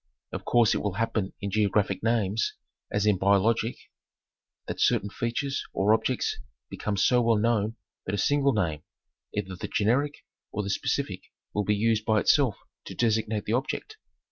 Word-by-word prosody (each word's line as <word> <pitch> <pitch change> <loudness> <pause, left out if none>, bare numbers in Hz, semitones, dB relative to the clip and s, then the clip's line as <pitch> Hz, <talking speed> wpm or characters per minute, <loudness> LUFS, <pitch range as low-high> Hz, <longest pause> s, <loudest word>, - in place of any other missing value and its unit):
Of - - -6
course 120 -3 +4
it - - 0
will 105 -2 -1
happen 110 -3 -1
in 100 -1 -3
geographic 105 -1 +1
names, 110 -2 0 0.4
as 105 0 +1
in 105 -3 +3
biologic, 105 +4 +2 0.9
that - - -5
certain 100 - +2
features 135 +4 -2
or 100 +3 +3
objects 125 +3 0 0.3
become 105 -1 -3
so 125 +6 +4
well 115 -1 +3
known 110 0 +1 0.3
that 95 - 0
a - - -3
single 140 +6 +3
name, 80 -8 -1 0.5
either 95 -2 -4
the - - -5
generic 135 +8 0 0.3
or 105 - -2
the 100 - -2
specific - - -1 0.3
will 105 -1 0
be 105 - +2
used 110 +1 +1
by 110 -1 +3
itself 130 -1 +3 0.3
to - - -8
designate 110 -2 0
the 110 - -1
object. 150 - -2
110 Hz, 165 wpm, -27 LUFS, 100-115 Hz, 0.9 s, course